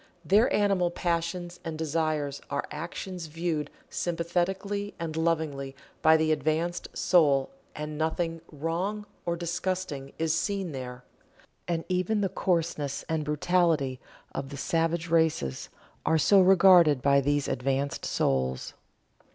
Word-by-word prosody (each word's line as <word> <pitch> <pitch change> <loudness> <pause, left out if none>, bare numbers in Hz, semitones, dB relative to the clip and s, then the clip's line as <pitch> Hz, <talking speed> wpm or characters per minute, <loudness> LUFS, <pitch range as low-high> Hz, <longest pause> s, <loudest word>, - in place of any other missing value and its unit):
Their 210 - +4
animal 195 -4 +2
passions 175 +1 -2
and 160 -1 -4
desires 155 -3 -1
are 140 0 -2
actions 170 +2 -5
viewed 155 -2 -2 0.2
sympathetically 185 +4 -2
and 165 -2 -4
lovingly 155 -5 -1 0.3
by 160 0 +6
the 155 0 +1
advanced 155 +3 0
soul, 145 -7 +3 0.2
and 150 0 -5
nothing 165 +1 -1
"Wrong" 170 +8 -2 0.2
or 170 - +1
disgusting 170 -4 -3
is 160 -1 +1
seen 195 0 -1
there. 125 -2 -7 0.6
And 165 -1 -1
even 185 +3 0
the 195 - +1
coarseness 165 -6 -1
and 160 -1 -1
brutality 150 -3 +1 0.3
of 135 - -4
the 140 - -7
savage 165 +3 0
races 160 - +1 0.3
are 160 - +3
so 195 +5 +5
regarded 180 -7 +6
by 140 0 +5
these 145 +1 +1
advanced 135 +2 -1
souls. 65 -1 0
165 Hz, 125 wpm, -28 LUFS, 145-175 Hz, 0.6 s, by